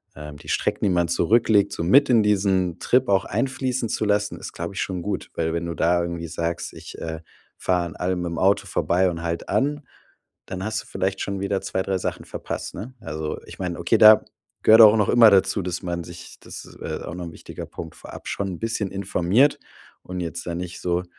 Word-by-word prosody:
ähm, 75 -2 -9
die - - -13
Strecken, - - -1
die - - +3
man 85 -2 +1
zurücklegt, 110 +3 +3
so - - -3
mit 130 +12 +5
in 115 -3 +5
diesen 95 -4 +1
Trip 125 -1 +2
auch 95 -1 +3
einfließen 130 +1 -1
zu 110 - -1
lassen, 105 0 0
ist, - - -8
glaube 85 +3 -5
ich - - -3
schon 90 -2 -3
gut, 105 +4 -4
weil 80 0 -1
wenn 85 0 -2
du 85 - -3
da 85 +1 +2
irgendwie 85 -1 -4
sagst: 85 +1 -3
„Ich, - - -10
äh, 80 -1 -5 0.4
fahre 90 -1 0
an 85 - -10
allem 90 0 -1
mitm 85 -1 -4
Auto 95 +2 +2
vorbei 90 +2 +1
und 85 -1 -6
halte 85 0 -4
an,“ 145 +2 0 0.7
dann 95 0 -5
hast 110 +1 -2
du - - -18
vielleicht 95 +1 -2
schon 100 -1 -3
wieder 100 0 0
2, 95 -1 -2
3 95 -1 -1
Sachen - - -4
verpasst, - - -6
ne, 125 +5 -7
also, 75 0 -4
ich - - -12
meine 90 -2 -3
okay, 85 +6 +2
da 110 0 +8 0.4
gehört 110 +1 +7
auch 110 -1 +9
noch 105 -3 +2
immer 115 -2 +7
dazu, 100 +1 +3
dass 90 -1 -4
man 85 -1 -3
sich 85 0 -11
das - - -9 0.2
äh, - - -4
auch 85 - -6
noch 90 -1 -6
'n 85 - -7
wichtiger - - -9
Punkt, 80 -1 -9
vorab - - -11
schon 100 - -2
'n - - -12
bisschen 110 -3 -2
informiert 100 +7 +2 0.4
und 90 0 -6
jetzt 85 0 -5
da 85 - -3
nicht 90 0 -6
so, 90 0 0
95 Hz, 220 wpm, -23 LUFS, 85-105 Hz, 0.7 s, auch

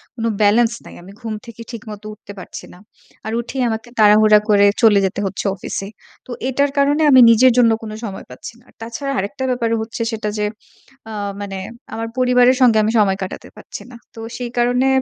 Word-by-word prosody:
কোনো 230 -1 -2
balance 225 +3 +3
নাই। - - -12
আমি 190 - -13
ঘুম 225 -2 -5
থেকে 230 -1 -11
ঠিকমত 215 -3 -9
উঠতে 210 -1 -13
পারছি 185 - -9
না। - - -15 0.5
আর 220 - -4
উঠেই 260 +2 -5
আমাকে 225 +1 -5
তাড়াহুড়া 215 0 +6
করে 205 -1 +5 0.2
চলে 215 -4 +5
যেতে 190 - -3
হচ্ছে 195 +1 -4
অফিসে। 195 0 -5 0.4
তো - - -11 0.2
এটার 280 +2 +1
কারণে 285 +2 +2
আমি 260 - +7
নিজের 255 +3 +5
জন্য 235 -2 +5
কোন 215 - -7
সময় 200 -4 -7
পাচ্ছি 125 - -10
না। - - -28 0.2
তাছাড়া 235 +5 -5
আরেকটা 200 +7 -4
ব্যাপার 240 -2 -1
হচ্ছে 225 +1 -7
সেটা 220 -1 -3
যে, 210 - 0 0.6
আ - - -7 0.3
মানে 195 -1 -5 0.4
আমার 225 +1 -4
পরিবারের 250 0 +4
সঙ্গে 240 -3 +5
আমি 215 - +1
সময় 195 -2 +2
কাটাতে 185 - -8
পারছি - - -10
না। - - -12 0.2
তো - - -12 0.2
সেই 245 -1 -5
কারণে 245 +2 +2
225 Hz, 190 wpm, -18 LUFS, 210-245 Hz, 0.6 s, আমি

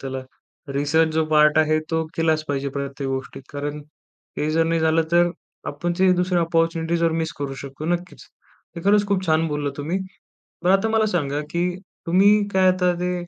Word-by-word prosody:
त्याला 135 -1 -5 0.5
रिसर्च 155 +3 +2
जो 160 0 +2
पार्ट 150 0 +5
आहे 155 0 +3
तो 160 0 0
केलाच 160 -1 +1
पाहिजे 140 0 -1
प्रत्येक 140 0 -4
गोष्टीत. 135 0 -5
कारण 145 +1 -4 0.6
हे 150 - 0
जर 165 +1 +2
नाही 165 0 0
झालं 160 +1 +3
तर 175 0 +4 0.4
आपण 175 +4 -2
जे 190 0 +4
दुसरे 180 0 +1
ऑपॉर्च्युनिटी 165 0 +1
जर 165 -1 +1
मिस 160 0 -2
करू 140 -1 -4
शकतो 135 +2 -8
नक्कीच. 175 +1 -3 0.5
ते 170 - -4
खरंच 205 +1 +4
खूप 190 -2 0
छान 160 0 +2
बोलला 150 -1 -2
तुम्ही. 160 +6 -2 0.7
बरं 180 - +4
आता 195 +3 +3
मला 220 -1 +2
सांगा 145 -4 -1
की 170 +2 0 0.4
तुम्ही 200 +4 +4
काय 190 -1 +4
आता 180 -1 +1
ते 180 0 -1
165 Hz, 180 wpm, -22 LUFS, 150-180 Hz, 0.7 s, पार्ट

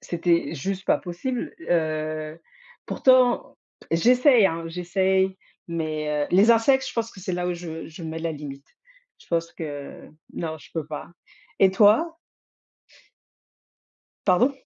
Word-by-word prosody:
C'était 170 -1 0
juste 190 +6 -4
pas - - +3
possible, 195 +8 -4
heu, 155 -1 -1 0.5
pourtant, 255 - +3 0.3
j'essaie, 245 - +5
hein, 165 -1 -3
j'essaie 190 +2 0 0.3
mais, 155 -3 -2
heu, - - -6
les 200 +6 +5
insectes, 265 +4 +4
je - - -7
pense 230 -1 -2
que 190 - -13
c'est 185 0 -4
là 180 0 -1
où - - 0
je 165 -2 -7
je 165 +2 -11
mets 160 0 -5
la 165 0 -2
limite. 140 -1 -9 0.5
Je - - -20
pense 165 -1 -1
que 145 -3 -8 0.2
non, 160 -2 -4
je - - -17
peux 160 -3 -3
pas 150 -1 -7 0.5
et 190 -1 +6
toi? 230 - +4 2.1
Pardon? 210 +9 +4
175 Hz, 140 wpm, -24 LUFS, 160-205 Hz, 2.1 s, et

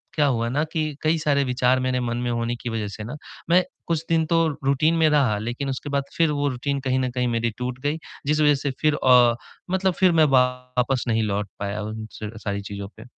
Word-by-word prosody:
क्या 150 -2 +3
हुआ 115 -3 0
ना 145 +5 0
कि 160 -1 0 0.2
कई 155 +1 +2
सारे 145 -2 +2
विचार 125 0 +2
मेरे 130 0 0
मन 120 -1 -2
में 120 0 -2
होने 120 0 -1
की 120 - -4
वजह 110 -2 -2
से 105 +2 -7
ना 120 +7 -6 0.3
मैं 180 +1 +5 0.2
कुछ 165 -1 0
दिन 160 -1 +3
तो 165 0 +2 0.2
रूटीन 145 +4 +3
में 160 -1 +4
रहा 135 -8 +3
लेक़िन 120 +5 -3
उसके 135 +2 -4
बाद 140 -1 0
फ़िर 165 -2 +3
वो 145 0 0
रूटीन 140 +2 -2
कहीं 130 0 +2
न 130 -1 0
कहीं 125 0 -1
मेरी 115 0 0
टूट 125 +1 -4
गई। 150 +2 0 0.3
जिस 150 +1 +2
वज़ह 150 -1 +5
से 140 0 -2
फ़िर 155 -1 +3
अ, 125 -3 +5 0.4
मतलब 190 -1 +1
फ़िर 185 -2 +5
मैं 160 -2 +5
वापस 125 0 0
नहीं 110 -1 +1
लौट 100 -1 -2
पाया 100 +1 -3
उन 110 +1 -5 0.2
स 105 0 -4
सारी 100 -1 -2
चीज़ों 100 0 -6
पे। 110 - -10
130 Hz, 230 wpm, -23 LUFS, 115-150 Hz, 0.4 s, मैं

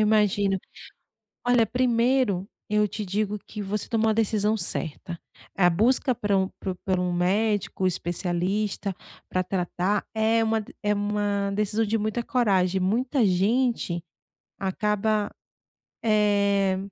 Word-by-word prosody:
imagino. 205 -2 +2 0.9
Olha, 245 -2 +5
primeiro 240 -4 +1 0.2
eu 210 0 +3
te 210 +2 -5
digo 210 +1 -1
que 210 -1 -6
você 205 +1 -3
tomou 225 -1 +2
a - - +3
decisão 215 -1 +1
certa. 170 -1 -4 0.4
A 180 -2 +5
busca 245 +8 +2
para 205 -3 0
um 190 0 +1
para 190 -2 -3
para 185 -1 +1
um 180 0 0
médico 195 +1 +1
especialista 185 +3 -1 0.3
para 185 - -1
tratar 185 +2 -1
é 225 +1 +2
uma 225 0 +1
de 210 - -12
é 210 0 +2
uma 205 -1 0
decisão 210 +2 0
de 225 - +1
muita 215 +2 -1
coragem, 195 -8 +2
muita 230 +7 +1
gente 195 -2 +1 0.5
acaba, 210 +2 0 0.7
eh, 200 -3 +3
205 Hz, 130 wpm, -25 LUFS, 190-220 Hz, 0.9 s, Olha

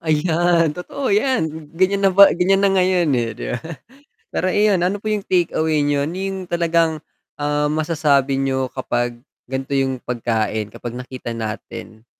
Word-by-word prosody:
Ayan 165 0 +2
totoo 200 - -3
'yan, 160 - 0
ganiyan 195 +2 +2
na - - +1
ba 200 0 +8
ganiyan 195 +3 +2
na 195 - +4
ngayon, 185 -3 +2
eh, 120 -2 0
'di - - -6
ba, - - -3 0.8
pero - - 0
ayon 205 -3 +3
ano 190 +3 0
po 215 - -12
yung 210 -1 0
take 175 -3 +1
away 155 -1 +1
niyo 145 -1 +1
yung 190 +2 -4
talagang, 165 -2 +1 0.4
ah, 145 0 0
masasabi 150 -4 +1
niyo 130 -1 0
kapag 120 -2 -2 0.2
ganito 135 +2 -5
yung 135 -1 0
pagkain, 110 -3 -2
kapag 120 - -7
nakita 125 -1 -7
natin. 110 0 -7
155 Hz, 155 wpm, -20 LUFS, 130-185 Hz, 0.8 s, ba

